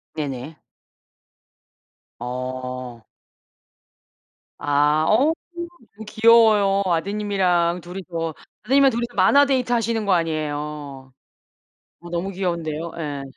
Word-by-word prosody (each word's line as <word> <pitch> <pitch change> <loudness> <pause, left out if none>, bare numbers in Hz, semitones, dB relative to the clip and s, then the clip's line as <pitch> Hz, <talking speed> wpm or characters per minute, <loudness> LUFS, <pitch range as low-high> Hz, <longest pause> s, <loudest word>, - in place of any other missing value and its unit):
네네. 145 0 -5 1.6
어. 125 0 -5 1.6
아 145 +2 +2
어우 270 +9 +4 0.7
귀여워요 220 -3 +5
아드님이랑 180 -1 0
2 175 +3 -9
이서. 165 -3 -4 0.3
아드님이랑 270 +4 +4
2 235 - -2
이서 240 0 -6
만화 275 +10 +5
데이트 255 -3 0
하시는 230 -1 0
거 200 - +3
아니에요. 150 -4 -3 0.9
어 175 0 -11
너무 175 +3 -2
귀여운데요. 170 -4 -3
예. 145 -3 -4
170 Hz, 205 characters per minute, -22 LUFS, 150-210 Hz, 1.6 s, 귀여워요